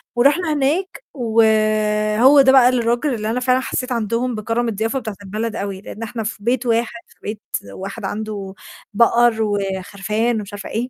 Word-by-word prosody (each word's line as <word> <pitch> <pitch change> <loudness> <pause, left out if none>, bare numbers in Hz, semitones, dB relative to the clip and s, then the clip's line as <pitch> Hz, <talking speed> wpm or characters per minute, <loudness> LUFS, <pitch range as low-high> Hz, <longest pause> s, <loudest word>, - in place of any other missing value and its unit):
ورُحنا 295 +7 +3
هناك 310 - -1
وهو 220 +1 +3
ده 265 -1 +5
بقى 260 -2 +7
الراجل 245 +3 0
اللي 215 -2 -3
أنا 240 +3 0
فعلًا 255 0 +2
حسّيت 255 0 -3
عندهم 235 +1 -1
بكرم 230 +3 -1
الضيافة 225 +4 -1
بتاعة 220 -4 -6
البلد 215 +3 -4
أوي، 195 -1 -4
لإن 215 +2 -8
إحنا 230 0 -4
في 210 -1 -6
بيت 240 +2 0
واحد 235 0 0
في - - -23
بيت 210 0 -6 0.3
واحد 195 +2 -7
عنده 205 -1 -5 0.4
بقر 235 +1 +4
وخرفان 205 +2 -1
ومش 205 -1 -8
عارفة 205 0 -7
إيه، 240 +3 -3
230 Hz, 165 wpm, -20 LUFS, 210-245 Hz, 0.4 s, بقى